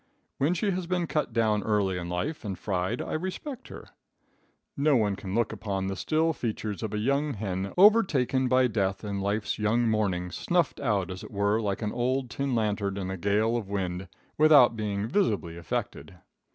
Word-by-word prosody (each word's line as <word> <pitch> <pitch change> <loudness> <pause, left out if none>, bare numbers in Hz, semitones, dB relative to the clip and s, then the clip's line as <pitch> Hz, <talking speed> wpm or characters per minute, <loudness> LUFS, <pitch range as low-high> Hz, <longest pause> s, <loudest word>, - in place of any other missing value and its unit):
When 150 +6 +2
she 200 +3 0
has 180 -1 -3
been 180 -1 0
cut 150 -5 -1
down 110 -2 +2
early 100 -4 0
in 85 0 -5
life 120 - -3
and 100 -4 -4
fried 95 +3 -2
I - - -5
respect 190 - -5
her. - - -11 0.9
No 145 +1 +3
one 105 -4 +2
can 95 0 -6
look 115 -1 +1
upon 95 -3 -3
the 95 0 -2
still 160 - +1
features 110 -5 -4
of 110 -3 -3
a - - -1
young 140 +6 0
hen 95 -1 -3
overtaken 165 - +4
by 130 0 +4
death 100 -5 -1
in 100 -2 -3
life's 100 +2 -1
young 115 +3 +2
morning, 95 -5 0
snuffed 175 - 0
out 105 -9 0
as 95 - -7
it - - -9
were, 100 +2 +1
like 100 0 -2
an 105 - -1
old 125 0 -1
tin 135 -1 -1
lantern 105 -3 -1
in 95 -1 -3
a - - -3
gale 105 +5 +1
of 110 -5 -3
wind, 95 -2 -3 0.3
without 145 -6 +7
being 105 -1 -2
visibly 105 - 0
affected. 85 -2 -4
110 Hz, 190 wpm, -28 LUFS, 100-135 Hz, 0.9 s, without